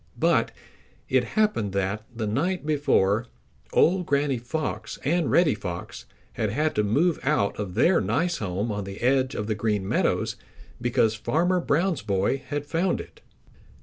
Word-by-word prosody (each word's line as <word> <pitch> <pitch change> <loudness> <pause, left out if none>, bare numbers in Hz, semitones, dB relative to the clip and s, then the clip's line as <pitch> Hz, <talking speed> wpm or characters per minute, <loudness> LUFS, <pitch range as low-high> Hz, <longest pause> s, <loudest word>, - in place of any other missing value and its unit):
But - - +2 0.6
it - - +3
happened 210 - +1
that, 100 +2 -1
the 115 -2 -4
night 150 - -1
before, 125 -7 +2 0.4
old 180 +1 +3
Granny 140 -2 +1
Fox 150 +6 -4
and 170 +3 +1
Reddy 170 -5 +4
Fox 95 -5 -7 0.3
had 110 - -1
had 150 +8 0
to 105 - +1
move 150 - +2
out 135 -8 +1
of 95 -4 -4
their 175 -5 +4
nice 145 - 0
home 100 +2 -2
on 105 -1 -3
the 95 0 -8
edge 130 +2 +2
of 105 - -2
the 110 - -1
Green 105 -2 -1
Meadows - - 0 0.4
because 115 -2 +2
Farmer 170 +11 +1
Brown's 170 0 +1
boy 105 +5 0
had 145 0 -3
found 170 +5 0
it. - - -11
125 Hz, 155 wpm, -25 LUFS, 105-160 Hz, 0.6 s, Reddy